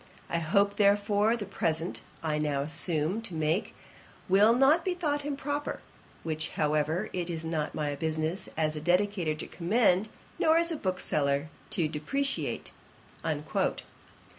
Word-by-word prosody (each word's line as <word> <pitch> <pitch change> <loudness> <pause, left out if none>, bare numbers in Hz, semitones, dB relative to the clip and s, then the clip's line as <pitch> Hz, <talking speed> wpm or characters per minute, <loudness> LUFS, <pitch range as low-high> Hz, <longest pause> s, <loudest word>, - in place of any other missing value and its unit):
I 170 - +1
hope, 200 +5 +2
therefore, 205 +2 +3
the 210 - -4
present 165 -2 -1 0.2
I 155 -1 0
now 145 -2 0
presume 160 +5 -1
to 215 -7 -6
make, 160 +5 0 0.5
will 205 +5 +6
not 280 +6 +5
be 365 0 0
thought 295 -5 -1
improper; 290 0 -3 0.4
which, 155 -1 -3
however, 155 +2 +1
it 180 -1 -2
is 165 -1 -3
not 160 -2 -2
my 150 -1 -1
business 160 +4 -1
as 155 -1 +1
a 150 - -4
dedicator 180 -1 +1
to - - -5
commend, 200 +2 +2 0.3
nor 315 +1 +5
as 335 0 +3
a - - 0
bookseller 150 - 0 0.2
to 165 - +1
depreciate.' 275 - -2
175 Hz, 140 wpm, -29 LUFS, 155-220 Hz, 0.5 s, will